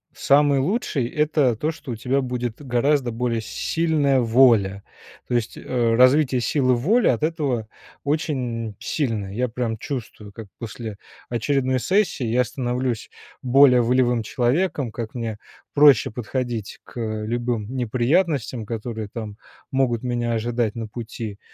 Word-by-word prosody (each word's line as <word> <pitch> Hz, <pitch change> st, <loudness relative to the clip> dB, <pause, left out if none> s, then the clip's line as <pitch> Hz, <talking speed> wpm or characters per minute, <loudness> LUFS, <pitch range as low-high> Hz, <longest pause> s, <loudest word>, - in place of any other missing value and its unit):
Самый 140 Hz, 0 st, +4 dB
лучший- 150 Hz, -, 0 dB
это 150 Hz, -4 st, +2 dB
то, 150 Hz, +9 st, -1 dB
что 150 Hz, -4 st, -9 dB
у -, -, -3 dB
тебя 130 Hz, +5 st, 0 dB
будет 125 Hz, -1 st, -4 dB
гораздо 130 Hz, 0 st, +1 dB
более 115 Hz, 0 st, -1 dB
сильная 150 Hz, +2 st, +1 dB
воля. 115 Hz, -5 st, +4 dB, 0.4 s
То -, -, -3 dB
есть, 120 Hz, -1 st, -1 dB
э, 120 Hz, -3 st, 0 dB
развитие 130 Hz, +1 st, +4 dB
силы 130 Hz, 0 st, +2 dB
воли 205 Hz, -, +2 dB
от 120 Hz, -, +1 dB
этого 145 Hz, -9 st, -1 dB, 0.4 s
очень 125 Hz, -7 st, -2 dB
сильное. 110 Hz, -10 st, -2 dB
Я 125 Hz, +4 st, 0 dB
прям 115 Hz, -1 st, -3 dB
чувствую, 110 Hz, -5 st, -6 dB
как 110 Hz, +1 st, -10 dB
после 110 Hz, -2 st, -6 dB, 0.3 s
очередной 130 Hz, +2 st, 0 dB
сессии 185 Hz, -, +1 dB
я 125 Hz, +3 st, +2 dB
становлюсь 125 Hz, -1 st, -3 dB, 0.3 s
более 130 Hz, 0 st, +6 dB
волевым 120 Hz, 0 st, +2 dB
человеком, 130 Hz, -, 0 dB
как 115 Hz, 0 st, -6 dB
мне 115 Hz, -3 st, -4 dB, 0.3 s
проще 145 Hz, -4 st, +6 dB
подходить 120 Hz, -1 st, -4 dB
к -, -, -10 dB, 0.3 s
любым 120 Hz, -1 st, -2 dB
неприятностям, 130 Hz, -, 0 dB
которые 110 Hz, -1 st, -4 dB
там 110 Hz, -3 st, -6 dB, 0.3 s
могут 130 Hz, -3 st, +1 dB
меня 120 Hz, -1 st, -1 dB
ожидать 115 Hz, -1 st, -1 dB
на 115 Hz, -1 st, -4 dB
пути. 110 Hz, -2 st, -7 dB
125 Hz, 135 wpm, -23 LUFS, 115-135 Hz, 0.4 s, более